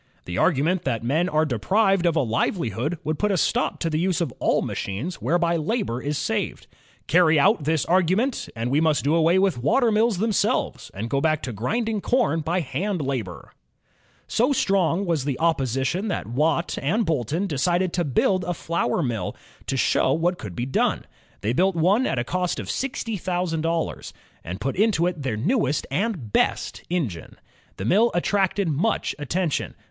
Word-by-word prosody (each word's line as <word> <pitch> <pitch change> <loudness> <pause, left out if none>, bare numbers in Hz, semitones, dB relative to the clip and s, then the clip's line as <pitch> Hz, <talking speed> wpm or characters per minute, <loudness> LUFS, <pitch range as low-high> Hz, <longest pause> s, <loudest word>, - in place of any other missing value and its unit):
The 90 - -5
argument 165 +3 +2
that 115 -4 -2
men 155 +9 +1
are 155 -2 +2
deprived 190 - +2
of 165 - +1
a 160 - +3
livelihood 120 - -1
would 155 +1 -2
put 210 - +1
a 190 - +1
stop - - +1
to - - 0
the 155 -1 0
use 180 0 +1
of 165 -8 -2
all - - +2
machines 120 - -4
whereby 170 +5 +1
labor 155 - -2
is 145 +1 -2
saved. - - -2 0.4
Carry 165 -3 +4
out 185 -2 +3
this 160 -1 +1
argu 185 +1 +3
ment, 255 +3 -1
and 115 +2 -2
we 145 +3 +3
must 155 -2 +2
do 145 +3 +2
away 165 +2 +4
with 190 -9 +2
water 235 - +3
mills 215 -1 +2
themselves, 215 +1 0
and 105 +4 -4
go 140 - +1
back 155 0 +1
again 125 - -5
to 100 - -11
grinding 220 - -1
com 240 -10 +1
by 170 +4 0
hand 175 +7 -2
labor." 130 - -4 0.7
So 245 +5 +1
strong 195 - +1
was 165 -6 0
the 140 -2 -2
opposition 140 - 0
that 200 - -2
Watt 155 - 0
and 210 +11 +1
Boulton 160 - -1
decided 175 +3 0
to 175 - +1
build 175 +6 +1
a 175 - -2
flour 170 +1 -1
mill, 115 -8 -3 0.3
to 135 - -1
show 130 - +2
what 175 +4 0
could 100 -5 -7
be 120 - -2
done. 130 - 0 0.4
They 105 +3 0
built 185 +6 +2
one 195 +10 +3
at - - -1
a 120 - +1
cost 180 +5 -2
of - - -4
sixty 240 -5 -3
thousand 175 -3 -2
dollars, 165 0 -2 0.3
and 90 +3 -6
put 135 +5 -2
into 200 -4 +2
it 175 -4 -2
their 130 -6 -2
newest 155 - 0
and 170 - -2
best - - 0
engine. 135 - -3 0.4
The 95 - -4
mill 215 - +4
attracted 195 +1 +1
much 165 +9 0
attention. 160 +2 -2
165 Hz, 185 wpm, -24 LUFS, 135-190 Hz, 0.7 s, Carry